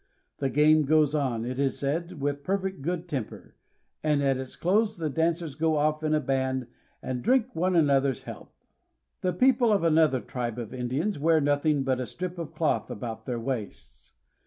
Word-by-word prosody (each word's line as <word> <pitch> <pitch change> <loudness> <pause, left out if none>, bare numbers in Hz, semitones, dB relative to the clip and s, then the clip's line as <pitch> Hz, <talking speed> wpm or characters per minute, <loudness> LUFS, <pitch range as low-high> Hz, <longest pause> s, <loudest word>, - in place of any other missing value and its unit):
The 135 - 0
game 150 +3 +4
goes 155 0 +3
on, 130 -6 -1
it 130 +2 -4
is 140 -1 0
said, 160 +4 -2
with 140 0 -2
perfect 190 -1 -2
good 175 +3 -3
temper, 135 -9 -5 0.5
and 150 -2 +1
at 135 -1 +2
its 130 -1 -7
close 210 +4 +1
the 160 -3 -2
dancers 165 0 0
go 160 +2 +1
off 155 +1 +1
in 155 0 +1
a - - +3
band 130 -2 -1 0.4
and 125 -1 -3
drink 255 - +2
one 180 +2 +1
another's 140 -4 +2
health. - - -11 0.6
The 185 - +1
people 240 +4 +3
of 200 -4 +2
another 160 -5 +4
tribe 120 -2 -4
of 115 -3 -6
Indians 135 +9 -2
wear 160 +2 +4
nothing 145 0 +1
but 130 -1 0
a 125 - -3
strip 180 - -5
of 165 -3 -6
cloth 160 - 0
about 115 -3 -6
their 120 -2 -2
waists. 105 - -6
150 Hz, 185 wpm, -27 LUFS, 130-165 Hz, 0.6 s, game